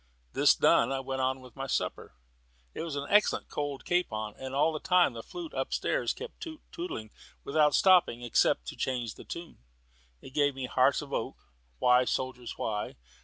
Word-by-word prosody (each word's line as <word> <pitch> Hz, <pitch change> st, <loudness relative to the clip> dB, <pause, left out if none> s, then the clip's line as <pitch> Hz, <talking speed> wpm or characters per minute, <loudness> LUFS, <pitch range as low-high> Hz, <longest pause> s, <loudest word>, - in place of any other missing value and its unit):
This -, -, +5 dB
done, -, -, +4 dB
I 135 Hz, -, 0 dB
went 135 Hz, 0 st, -3 dB
on 130 Hz, 0 st, 0 dB
with 125 Hz, -1 st, -14 dB
my 135 Hz, 0 st, -4 dB
supper 65 Hz, -, -2 dB, 0.6 s
it -, -, -5 dB
was 160 Hz, -3 st, -4 dB
an 140 Hz, 0 st, -3 dB
excellent 210 Hz, 0 st, +3 dB
cold 145 Hz, -2 st, -4 dB
capon 110 Hz, -12 st, -1 dB
and 130 Hz, 0 st, -5 dB
all 155 Hz, +3 st, +3 dB
the 155 Hz, -, -3 dB
time 180 Hz, -5 st, +3 dB
the 115 Hz, -, -6 dB
flute 340 Hz, -, -8 dB
up -, -, -2 dB
stairs -, -, 0 dB
kept 470 Hz, -, -9 dB
toot 315 Hz, -3 st, -7 dB
tootling 110 Hz, -, -5 dB, 0.3 s
without 150 Hz, 0 st, +3 dB
stopping, 180 Hz, -11 st, +4 dB
except 115 Hz, -, +2 dB
to -, -, -8 dB
change 120 Hz, -4 st, -2 dB
the -, -, -12 dB
tune. 170 Hz, -1 st, -8 dB, 0.6 s
It 130 Hz, -, -13 dB
gave 145 Hz, -1 st, +2 dB
me 135 Hz, -1 st, -4 dB
"Hearts -, -, +2 dB
of -, -, -10 dB
Oak," -, -, -2 dB, 0.4 s
"Why, 125 Hz, 0 st, +4 dB
Soldiers, 125 Hz, -1 st, -3 dB
why?" 105 Hz, -2 st, -3 dB
135 Hz, 185 wpm, -30 LUFS, 125-165 Hz, 0.6 s, This